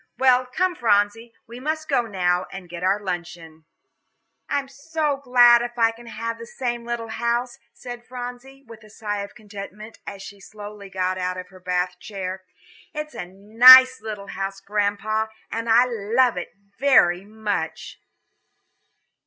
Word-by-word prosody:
"Well, 255 -1 +4
come, 360 +8 0
Phronsie, 225 -2 +1
we 235 +2 -10
must 310 +3 -3
go 275 -4 +2
now 180 -3 0
and 195 -2 -9
get 170 0 -8
our 195 +2 +2
luncheon." 175 -4 -7 0.8
"I - - +1
am 275 -1 -3
so 290 +1 -2
glad 245 -3 +6
if 240 0 -5
I 230 -1 +4
can 235 +1 -15
have 230 0 -5
the 230 - -9
same 240 -2 -4
little 235 -1 -4
house," 235 +2 -2
said 245 -1 -9
Phronsie, 250 +2 -8
with 230 -1 -13
a 215 - -16
sigh 205 -1 -4
of 200 - -9
contentment, 210 +1 -10
as 195 -1 -7
she 200 0 -11
slowly 205 0 -10
got 185 0 -2
out 180 0 -2
of 185 0 -8
her 185 0 -15
Bath 180 0 -2
chair. 190 -1 -6 0.5
"It 300 0 -4
is - - -22
a 180 - -6
nice 250 +7 +8
little 210 -2 -7
house, 195 0 -4
Grandpapa, 210 +2 -1 0.2
and 230 +1 -3
I 235 +3 +6
love 235 +1 +1
it 180 - -6 0.3
very 195 -10 +4
much." 205 -5 -4
220 Hz, 160 wpm, -23 LUFS, 195-245 Hz, 0.8 s, nice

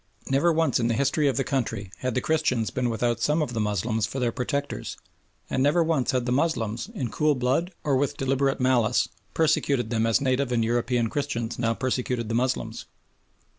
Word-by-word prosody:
Never 140 +6 +4
once 160 -5 +2
in 115 - +1
the 115 - +1
history 140 +4 +2
of 135 - +1
the 135 - +2
country 115 -8 -2
had 130 -2 -2
the 125 - +1
Christians 125 -8 0
been 125 -1 -1
without 120 0 0
some 150 +5 +2
of 125 - -5
the 115 - -2
Moslems 105 +1 0
for 130 - -6
their 120 -2 +1
protectors, 140 +4 -3 0.5
and 130 - -1
never 150 +5 +4
once 160 -6 0
had 125 -2 +1
the 125 - -1
Moslems, 125 - 0
in 125 - -3
cool 150 -1 +2
blood 135 +8 0
or 140 -2 +2
with 135 +1 0
deliberate 135 +1 +1
malice, 125 -2 +2 0.3
persecuted 140 -6 +1
them 115 -1 +1
as 115 - +3
native 130 -1 0
and 115 -2 +2
European 120 0 +1
Christians 120 -4 -3
now 115 -1 +1
persecuted 125 -2 -2
the - - -2
Moslems. 125 +2 -1
125 Hz, 195 wpm, -26 LUFS, 115-140 Hz, 0.5 s, Never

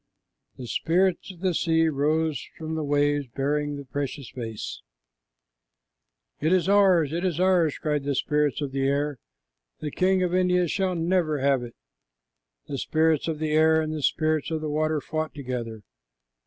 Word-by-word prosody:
The 125 - -7
spirits 180 +9 0
of 175 -2 -16
the 185 -2 +1
sea 165 0 +2
rose 155 +1 0
from 160 0 -5
the 160 -1 -2
waves 145 -1 +1
bearing 145 +4 -1
the 140 - -8
precious 140 -1 -5
vase. 115 -4 -6 1.6
"It 155 +3 +1
is 185 -1 +3
ours, 190 -7 +4
it 170 +2 -2
is 175 -3 -1
ours," 180 -5 +3
cried 150 -2 -1
the 140 0 -1
spirits 150 +1 0
of 140 -2 -3
the 135 0 0
air. 140 -1 -1 0.6
"The 150 - -4
king 185 +3 +2
of 180 -1 -1
India 180 -1 +2
shall 185 +1 0
never 165 -2 +1
have 135 -1 +2
it." 120 -1 -9 0.9
The 140 - -4
spirits 160 +1 +1
of 160 -2 -2
the 155 0 -2
air 160 +1 +4
and 155 0 -2
the 155 - -4
spirits 155 +1 +1
of 160 -1 -2
the 155 -1 -3
water 155 0 0
fought 155 +2 -4
together. 120 -6 -5
155 Hz, 170 wpm, -25 LUFS, 140-165 Hz, 1.6 s, ours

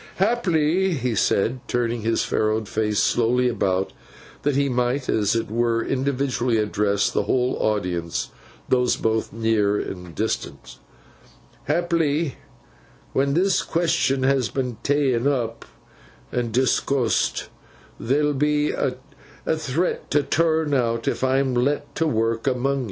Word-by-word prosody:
'Haply,' 190 -4 +2
he 125 -3 -1
said, 110 +4 +1
turning 120 -1 -1
his 115 +1 +1
furrowed 110 0 0
face 105 0 -1
slowly 125 +2 +2
about, 95 -5 0 0.5
that 145 -1 0
he 140 0 +2
might 125 +1 0
as 105 0 +1
it 115 -2 -2
were 115 0 +1
individually 130 -3 0
address 105 -1 +1
the 100 - 0
whole 125 +3 +1
audience, 90 -6 -1 0.4
those 125 -1 +2
both 110 0 -1
near 110 -2 +1
and 90 -3 -7
distant; 65 -2 -4 0.9
'haply, 165 -2 +1 0.8
when 140 +1 +1
this 190 +3 +3
question 160 -5 +1
has 135 -3 +2
been 125 -4 -3
tak'n 135 -3 +1
up 120 -5 -1 0.7
and 120 -2 -1
discoosed, 130 0 +1 0.5
there'll 145 +5 +1
be 150 +1 +1
a 130 -2 -1 0.6
threat 155 +3 -2
to 145 0 +2
turn 160 +1 +1
out 115 -3 0
if - - -1
I'm 130 0 +2
let 130 +4 0
to 165 - 0
work 115 -2 0
among 135 +2 +1
yo. - - -1
125 Hz, 130 wpm, -23 LUFS, 115-145 Hz, 0.9 s, this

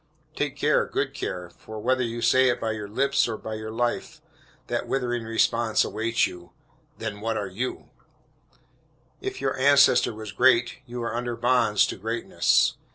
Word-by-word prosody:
Take - - -2
care, - - +2
good - - -2
care; 90 -1 -5
for 110 +5 -11
whether 130 +4 +1
you 120 -1 -3
say 130 0 +5
it 120 - 0
by 115 - -1
your 105 -1 -5
lips 135 +7 +1
or 110 -2 -3
by 110 - -7
your 110 0 -5
life, 120 +2 -2 0.5
that - - -3
withering 120 -3 -1
response 115 0 +2
awaits 115 +1 0
you 85 -1 -9 0.4
"then 110 -2 -5
what 115 0 -1
are 100 - -2
you?" 110 +8 -5 1.3
If 390 0 -5
your - - 0
ancestor 140 -2 +5
was 110 -2 -7
great, 125 0 +3
you 120 0 -5
are 115 -1 -3
under 120 0 -2
bonds 120 -3 +3
to - - -5
greatness. 115 +4 +1
115 Hz, 165 wpm, -25 LUFS, 110-125 Hz, 1.3 s, say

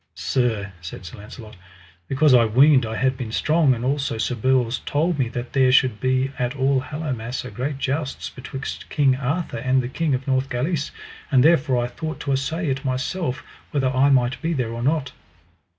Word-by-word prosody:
Sir, 110 -6 -1
said 85 +2 -8
Sir 85 - -9
Launcelot, 110 +1 -11 0.5
because 140 +1 +3
I 120 -2 +7
weened 130 +2 +5
I 110 - -4
had 130 +2 +1
been 125 -4 -6
strong, 150 +1 +3
and 120 +1 -5
also 135 -3 -1
Sir 110 +3 -1
Bors 125 0 +1
told 160 +2 0
me 125 -3 +1
that 120 0 -6
there 130 -2 +4
should 125 -4 +3
be 130 +2 +1
at 125 +2 -1
All 135 0 +2
Hallowmass 130 -4 -4
a 125 - -7
great 135 +6 -3
jousts 140 +1 -3
betwixt 135 +1 -7
King 140 -4 +3
Arthur 140 0 -2
and 130 +2 +1
the - - -3
King 150 +2 0
of 130 - -5
Northgalis, 135 +4 0 0.4
and 130 -3 +5
therefore 140 -6 +3
I - - -1
thought 155 +6 -6
to 140 - -2
assay 160 +6 -1
it 135 0 -1
myself 135 +2 -2 0.3
whether 135 -3 0
I 135 +2 +4
might 130 -1 +2
be 165 0 -1
there 125 -6 -2
or 115 - -5
not. 140 0 0
130 Hz, 190 wpm, -23 LUFS, 125-140 Hz, 0.5 s, I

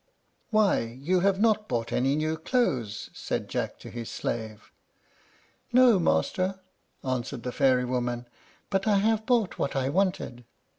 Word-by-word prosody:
"Why, 215 -3 +3 0.2
you 180 +7 +1
have 195 +1 +2
not 215 -1 +2
bought 115 -2 -1
any 135 +3 +2
new 155 +1 0
clothes!" 140 - -1
said - - -3
Jack - - -3
to - - -9
his 120 -1 -6
slave. 110 -2 -5 1.0
"No, 245 -4 +6
master," 185 - +1 0.4
answered 130 -1 -3
the 125 - -3
fairy 130 -1 +3
woman; 120 -1 -2 0.4
"but 195 +1 0
I 205 -2 +4
have 220 +2 +1
bought 235 -7 +1
what 140 - -1
I 135 -1 0
wanted." 175 -8 -1
155 Hz, 145 wpm, -27 LUFS, 125-200 Hz, 1.0 s, No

